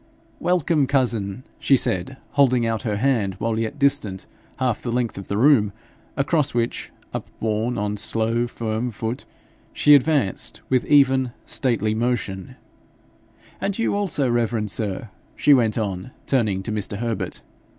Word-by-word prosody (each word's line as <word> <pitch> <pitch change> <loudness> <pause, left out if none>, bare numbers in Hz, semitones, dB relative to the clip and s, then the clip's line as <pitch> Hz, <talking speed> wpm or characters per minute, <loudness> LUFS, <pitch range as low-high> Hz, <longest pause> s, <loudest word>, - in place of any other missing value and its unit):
'Welcome, 170 -5 +2
cousin!' 120 -5 0 0.2
she 135 - +4
said, 95 +4 0
holding 130 -4 +3
out 115 -1 -1
her 105 -3 -2
hand 110 -6 +1
while 110 +3 -1
yet 115 +6 -3
distant 110 -9 +1 0.3
half 125 -4 0
the 120 - -3
length 120 -1 -1
of 100 - -8
the 100 - -2
room, 115 -5 +4 0.4
across 145 -1 +1
which, 115 -1 -1 0.2
upborne 110 +2 -2
on 105 0 -2
slow 115 +3 +1
firm 115 0 -3
foot, 115 +2 -4 0.5
she 150 - +5
advanced 140 - +2
with 130 -2 +2
even, 135 -4 +4
stately 110 -5 0
motion, 110 -5 -2 1.1
'And 195 0 -1
you 230 - 0
also, 185 -9 +1
reverend 115 -3 0
sir,' 100 +3 -2 0.3
she 145 - +5
went 115 -5 +3
on, 100 0 -3 0.2
turning 105 -8 +1
to 110 - -4
Mr. 105 -1 -2
Herbert. 110 -5 -3
115 Hz, 140 wpm, -23 LUFS, 105-135 Hz, 1.1 s, she